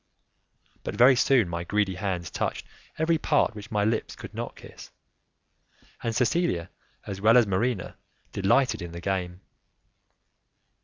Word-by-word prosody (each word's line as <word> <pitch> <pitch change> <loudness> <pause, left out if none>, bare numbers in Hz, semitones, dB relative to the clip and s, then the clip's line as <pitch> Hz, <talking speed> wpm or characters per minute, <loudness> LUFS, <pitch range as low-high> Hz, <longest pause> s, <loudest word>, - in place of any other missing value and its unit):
But - - -4
very 125 +4 +7
soon 125 -4 +3
my 85 0 -4
greedy 100 +1 0
hands 90 -3 -3
touched - - -3 0.3
every 160 +1 +2
part 150 -5 +2
which 105 0 -10
my 105 -1 +1
lips 110 +1 -1
could - - -10
not - - -5
kiss, - - -12 1.1
and 115 -1 -2
Cecilia, 125 - 0 0.3
as 100 -1 -6
well 110 +3 +6
as 120 - +6
Marina, 100 +1 -1 0.4
delighted 100 +7 +2
in 85 -1 -7
the 85 - -6
game. 90 -1 -3
105 Hz, 140 wpm, -26 LUFS, 90-125 Hz, 1.1 s, very